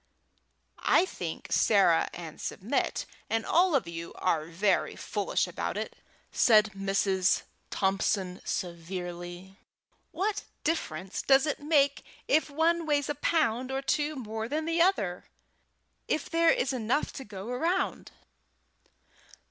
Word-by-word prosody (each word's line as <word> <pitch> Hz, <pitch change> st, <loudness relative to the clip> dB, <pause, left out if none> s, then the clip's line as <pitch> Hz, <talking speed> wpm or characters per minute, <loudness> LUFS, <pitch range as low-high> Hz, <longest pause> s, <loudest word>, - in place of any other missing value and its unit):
"I 360 Hz, -, +6 dB
think -, -, -6 dB
Sarah -, -, +4 dB
and -, -, -9 dB
Submit -, -, -2 dB, 0.2 s
and 225 Hz, 0 st, 0 dB
all 350 Hz, -1 st, +3 dB
of 260 Hz, -, +1 dB
you 170 Hz, 0 st, -6 dB
are 165 Hz, -4 st, 0 dB
very 185 Hz, +4 st, +1 dB
foolish -, -, -1 dB
about -, -, -4 dB
it," -, -, -4 dB, 0.4 s
said 215 Hz, -2 st, +5 dB
Mrs. 195 Hz, -1 st, +1 dB, 0.3 s
Thompson 195 Hz, -1 st, 0 dB
severely. 175 Hz, +1 st, -5 dB, 0.5 s
"What 410 Hz, +2 st, -1 dB, 0.2 s
difference 190 Hz, -, -2 dB
does 270 Hz, +1 st, +5 dB
it 300 Hz, -, -2 dB
make 290 Hz, -2 st, +2 dB, 0.2 s
if 310 Hz, -, +3 dB
one 325 Hz, +3 st, +1 dB
weighs 290 Hz, -1 st, +1 dB
a -, -, +1 dB
pound 260 Hz, -5 st, 0 dB
or 270 Hz, +1 st, -2 dB
two 300 Hz, +2 st, 0 dB
more 225 Hz, -3 st, -5 dB
than 310 Hz, +2 st, -1 dB
the 330 Hz, +1 st, +1 dB
other, 205 Hz, -, +1 dB, 0.8 s
if 310 Hz, -, -1 dB
there 335 Hz, 0 st, +4 dB
is 270 Hz, -3 st, +2 dB
enough 250 Hz, +4 st, 0 dB
to 270 Hz, -, -7 dB
go 200 Hz, -2 st, -8 dB
round?" 335 Hz, +9 st, -1 dB
245 Hz, 125 wpm, -29 LUFS, 190-310 Hz, 0.8 s, I